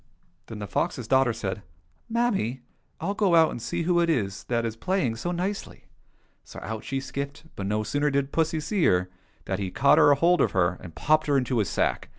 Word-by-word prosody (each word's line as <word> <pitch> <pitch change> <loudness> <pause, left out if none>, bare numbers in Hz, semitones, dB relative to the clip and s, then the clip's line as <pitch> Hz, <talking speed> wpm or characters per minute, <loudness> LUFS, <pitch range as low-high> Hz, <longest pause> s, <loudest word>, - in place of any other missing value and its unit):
" - - -40
Then 110 - -7
the 105 - -5
fox's 125 - -2
daughter 130 -1 +3
said, 105 -3 -4 0.3
" - - -39
Mammy, 200 - 0 0.4
I'll 190 +5 -2
go 195 -4 +2
out 160 -1 +5
and 120 - -6
see 170 +7 -2
who 175 +1 +2
it 170 -1 +2
is 105 -10 -1
that 120 -1 -1
is 110 -1 -3
playing 160 -5 -1
so 175 +9 -3
nicely! 185 +3 -4 0.3
" - - -41
So - - -10
out 110 +1 -5
she 135 - -2
skipped, 140 +2 -6
but 95 - -4
no 105 +1 0
sooner 145 +6 0
did 140 0 -1
pussy 160 -1 0
see 185 +4 -1
her 90 0 +2 0.3
than 95 0 -2
he 95 -2 -2
caught 140 +9 +4 0.2
hold 175 +4 +3
of - - +1
her 90 -1 +1
and 80 -3 -11
popped 155 - +2
her 145 -1 +3
into 125 -2 0
his 105 - 0
sack. - - -1
135 Hz, 220 wpm, -26 LUFS, 110-170 Hz, 0.4 s, out